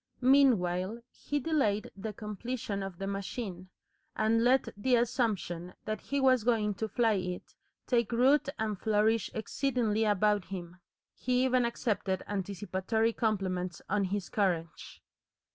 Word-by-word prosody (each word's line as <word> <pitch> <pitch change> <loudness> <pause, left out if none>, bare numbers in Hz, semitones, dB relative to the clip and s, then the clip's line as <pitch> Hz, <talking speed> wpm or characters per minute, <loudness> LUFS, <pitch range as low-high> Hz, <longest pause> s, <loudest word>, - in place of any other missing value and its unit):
Meanwhile 230 -6 +3
he 290 - -3
delayed 265 -9 0
the 205 +2 -5
completion 210 0 -4
of 195 -2 -6
the 195 - -4
machine, 195 -1 -5 0.5
and 225 +1 +2
let 255 +2 +4
the 245 +5 +2
assumption 215 -8 -1
that 215 0 -3
he 280 - -2
was 260 -4 +4
going 220 -3 +2
to 220 +3 -3
fly 225 +1 +2
it 180 -2 -4 0.3
take 235 -3 +1
root 265 +5 +4
and 215 -3 -2
flourish 220 0 +2
exceedingly 225 -2 0
about 210 -2 +2
him. 180 -2 -7 0.4
He 250 0 0
even 255 -1 +3
accepted 205 -5 -1
anticipatory 205 +3 -1
compliments 185 -6 -1
on 205 -1 +2
his 195 0 -2
courage. 170 -7 -2
215 Hz, 130 wpm, -31 LUFS, 195-240 Hz, 0.5 s, let